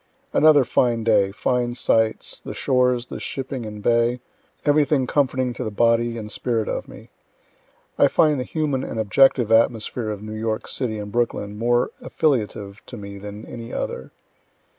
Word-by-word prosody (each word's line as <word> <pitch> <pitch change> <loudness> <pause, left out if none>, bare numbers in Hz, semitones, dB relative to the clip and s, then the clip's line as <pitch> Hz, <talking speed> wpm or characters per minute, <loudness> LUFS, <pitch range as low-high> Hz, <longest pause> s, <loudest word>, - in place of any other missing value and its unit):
Another 150 -2 +6
fine 120 -2 +1
day, 105 -3 +3
fine 120 +3 -1
sights, 110 -2 0
the - - -7
shores, 125 -1 +1
the - - -7
shipping 130 -3 -5
and 105 -1 -8
bay 120 +2 +2 0.5
everything 145 -2 +3
comforting 130 -2 0
to - - -5
the - - -2
body 115 +2 +2
and 105 -1 -7
spirit 115 -3 -1
of - - -3
me. - - -13 0.9
(I - - +7
find 150 -3 +3
the - - -1
human 145 -3 -2
and 115 - -4
objective 115 +1 +3
atmosphere 115 0 +2
of 105 -1 -5
New 110 0 -6
York 110 0 -3
city 115 -5 -2
and 105 -1 -6
Brooklyn 115 -3 -1
more 120 +3 +1
affiliative 105 -8 -1
to 120 - -8
me 100 -1 -8
than 105 +1 -8
any 115 -1 -8
other.) 65 - -4
115 Hz, 160 wpm, -22 LUFS, 110-125 Hz, 0.9 s, I